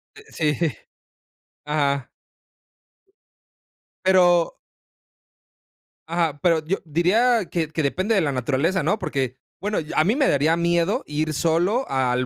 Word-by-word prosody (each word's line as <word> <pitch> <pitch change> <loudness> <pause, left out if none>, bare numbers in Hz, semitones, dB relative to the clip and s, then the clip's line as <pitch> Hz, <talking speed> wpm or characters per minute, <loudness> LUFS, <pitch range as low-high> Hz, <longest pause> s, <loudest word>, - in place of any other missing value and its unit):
Eh, 435 - -14
sí. 150 -2 0 1.1
Ajá. 140 -3 -1 2.0
Pero 175 -2 +4 1.5
Ajá, 165 -3 -1
pero 165 -3 +2
yo 190 +5 0
diría 200 +9 +2
que 165 -2 -1
que 160 - -2
depende 185 +9 0
de 195 - +3
la 150 -4 0
naturaleza, 140 +7 0
¿no? 205 +8 0
Porque, 135 - -3 0.2
bueno, 205 +2 -1 0.2
a 155 - +4
mí 210 +7 +1
me 280 -1 +2
daría 150 +4 +2
miedo 170 0 +1
ir 155 +1 -2
solo 175 - +1
al 130 -1 0
165 Hz, 120 wpm, -23 LUFS, 145-185 Hz, 2.0 s, Pero